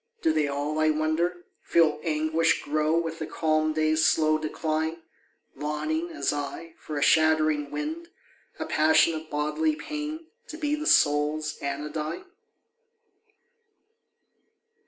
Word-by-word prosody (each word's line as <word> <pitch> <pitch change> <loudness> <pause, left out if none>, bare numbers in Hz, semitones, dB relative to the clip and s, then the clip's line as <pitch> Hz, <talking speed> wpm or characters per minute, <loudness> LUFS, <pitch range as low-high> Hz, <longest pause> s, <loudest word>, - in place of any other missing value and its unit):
Do 160 - +3
they 155 -2 +1
all, 145 +2 -2
I 155 0 +3
wonder, 160 +3 0 0.2
Feel 155 -3 +2
anguish 160 +1 +1
grow 155 +2 +1
with 165 -1 -2
the 155 - -4
calm 155 -1 +1
day's 155 0 +2
slow 155 -1 +3
decline, 155 +1 -2 0.6
Longing, 310 - -2
as 325 - -1
I, 145 +3 -5
for 150 - -6
a 145 - +1
shattering 155 -2 +3
wind, 320 +3 -4 0.5
a - - -4
passion 160 +2 +4
Of 155 0 -6
bodily 150 - 0
pain 305 +1 -5 0.2
to 315 - -8
be 300 -2 -1
the 305 +1 -2
soul's 150 +1 +3
anodyne? 150 - -4
155 Hz, 125 wpm, -26 LUFS, 150-170 Hz, 0.6 s, passion